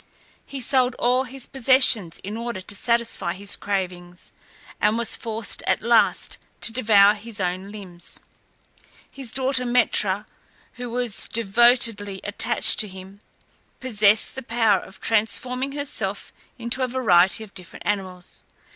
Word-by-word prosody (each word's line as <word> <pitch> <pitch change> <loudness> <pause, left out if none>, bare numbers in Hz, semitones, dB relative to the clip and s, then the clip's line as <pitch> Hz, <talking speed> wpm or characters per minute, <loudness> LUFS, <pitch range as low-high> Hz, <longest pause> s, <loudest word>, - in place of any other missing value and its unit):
He 275 - -7
sold 255 0 +2
all 250 +2 +1
his 260 0 -4
possessions 255 -9 +3
in 205 +3 -5
order 235 -3 -4
to 195 +2 -2
satisfy 230 -6 0
his 200 +1 -2
cravings, 180 -3 -5 0.5
and 210 +2 +2
was 235 -1 -1
forced 225 -2 -4
at - - +1
last 235 0 +2 0.2
to 225 - 0
devour 210 -4 +5
his 215 0 -7
own 185 +2 -3
limbs. 185 -5 -9 0.9
His 265 -4 -7
daughter 265 -1 0
Metra, 220 -5 +1 0.5
who 245 -1 -7
was 245 -2 -2
devotedly 225 -2 +2
attached 205 - +3
to 215 - +3
him, 190 +1 -12 0.6
possessed 215 -4 +3
the 265 - -7
power 225 -4 +2
of 190 - -13
transforming 250 +4 -1
herself 285 0 -4 0.2
into 240 +2 -2
a 255 - +1
variety 200 -6 +3
of 210 - -14
different 180 -2 -9
animals. 185 -3 -4
220 Hz, 135 wpm, -23 LUFS, 195-245 Hz, 0.9 s, devour